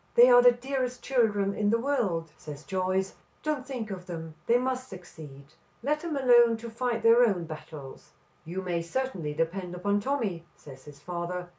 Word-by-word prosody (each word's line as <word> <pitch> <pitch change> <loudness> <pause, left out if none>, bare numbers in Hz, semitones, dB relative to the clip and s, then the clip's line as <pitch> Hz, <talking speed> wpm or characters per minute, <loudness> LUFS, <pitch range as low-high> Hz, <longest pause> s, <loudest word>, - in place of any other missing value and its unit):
"They 245 +1 +8
are 245 0 +8
the 245 0 +8
dearest 255 0 -3
children 210 -6 +1
in 205 0 0
the 230 - +3
world," 220 - -1
says 150 0 -10
Joyce. 190 0 -1 0.3
"Don't 295 -4 -2
think 240 -6 -5
of 185 -1 -7
them. 165 -2 -6
They 235 - +5
must 255 0 -2
succeed. 155 -7 -11 0.4
Let 300 +3 +1
them 320 -3 -3
alone 240 -3 +5
to 230 0 -8
fight 235 0 -2
their 230 +2 +7
own 195 -7 +2
battles." 155 -3 -10 0.3
"You 180 +4 -5
may 175 -2 -1
certainly 170 - -3
depend 175 +3 -2
upon 200 +3 0
Tommy," 210 -9 -2
says 130 -2 -14
his 145 -1 -13
father. 175 +2 -5
200 Hz, 175 wpm, -28 LUFS, 170-245 Hz, 0.4 s, They